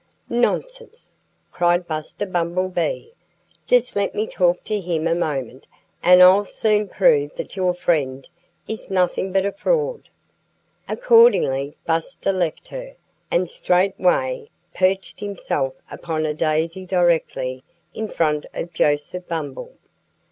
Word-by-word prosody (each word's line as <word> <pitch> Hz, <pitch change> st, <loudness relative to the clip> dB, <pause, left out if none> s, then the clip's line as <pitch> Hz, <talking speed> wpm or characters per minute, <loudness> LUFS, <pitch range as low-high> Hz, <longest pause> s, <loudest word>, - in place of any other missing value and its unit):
"Nonsense!" 475 Hz, -, -2 dB, 0.4 s
cried 175 Hz, 0 st, +2 dB
Buster 155 Hz, +5 st, -4 dB
Bumblebee. 185 Hz, -, -1 dB, 0.6 s
"Just 250 Hz, 0 st, +2 dB
let 200 Hz, -1 st, -1 dB
me 215 Hz, -, 0 dB
talk 180 Hz, -4 st, +1 dB
to 215 Hz, -1 st, -2 dB
him 170 Hz, -2 st, -1 dB
a 165 Hz, -, +2 dB
moment, 135 Hz, -7 st, -3 dB, 0.3 s
and 180 Hz, +1 st, +7 dB
I'll 190 Hz, +3 st, +7 dB
soon 210 Hz, 0 st, 0 dB
prove 460 Hz, -, +2 dB
that -, -, -7 dB
your 185 Hz, -2 st, +1 dB
friend 140 Hz, -7 st, -1 dB, 0.4 s
is 220 Hz, -, -6 dB
nothing 185 Hz, 0 st, 0 dB
but 195 Hz, 0 st, +2 dB
a 200 Hz, -, 0 dB
fraud." 475 Hz, -, -1 dB, 0.8 s
Accordingly 455 Hz, -, +4 dB
Buster 165 Hz, +4 st, -1 dB
left 175 Hz, -4 st, -2 dB
her, -, -, -8 dB, 0.3 s
and 180 Hz, +1 st, +1 dB
straightway 190 Hz, -, +1 dB, 0.2 s
perched 190 Hz, +1 st, 0 dB
himself 180 Hz, -9 st, -3 dB, 0.2 s
upon 160 Hz, -2 st, -3 dB
a 150 Hz, -, -1 dB
daisy 160 Hz, +4 st, -1 dB
directly 165 Hz, -8 st, 0 dB, 0.3 s
in 220 Hz, -, -4 dB
front 150 Hz, -6 st, 0 dB
of 170 Hz, 0 st, -5 dB
Joseph 150 Hz, +4 st, 0 dB
Bumble. 150 Hz, -5 st, -5 dB
180 Hz, 120 wpm, -21 LUFS, 160-210 Hz, 0.8 s, and